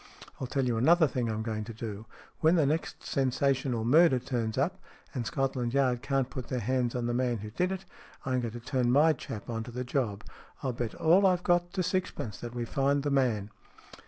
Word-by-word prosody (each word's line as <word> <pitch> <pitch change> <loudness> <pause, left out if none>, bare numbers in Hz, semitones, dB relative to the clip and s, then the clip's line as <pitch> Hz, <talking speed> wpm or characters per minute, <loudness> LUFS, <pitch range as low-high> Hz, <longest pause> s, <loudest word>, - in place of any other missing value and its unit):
I'll 130 - -3
tell 135 +1 0
you 120 -2 0
another 160 +8 +5
thing 125 -4 -2
I'm 110 0 -2
going 110 -1 -3
to 115 +1 -8
do. 110 -1 -6 0.3
When 160 +2 +4
the 160 -4 +4
next 155 +3 -2
sensational 130 -3 0
murder 155 +2 +6
turns 120 -3 -2
up, - - 0 0.3
and 120 -3 -3
Scotland 130 -3 -1
Yard 130 -3 +2
can't 135 -1 0
put 130 -2 -6
their 125 - -2
hands 125 +1 0
on 120 -1 -1
the 120 - 0
man 120 -1 +1
who 105 +1 -7
did 180 - 0
it, 190 0 -5 0.4
I'm 130 -1 0
going 115 -2 -4
to 120 - -6
turn 125 0 0
my 155 +5 +5
chap 110 -6 -7
on 115 -1 -3
to - - -8
the 125 +1 -4
job. 120 -5 -2 0.4
I'll 130 -2 -1
bet 115 -2 -4
all 180 +5 +5
I've 180 -1 +2
got 175 0 +2
to 185 - 0
sixpence 165 - -2
that 120 0 -7
we 120 -1 -2
find 140 +2 +1
the 145 - 0
man." 115 -7 +1
125 Hz, 215 wpm, -29 LUFS, 115-140 Hz, 0.4 s, murder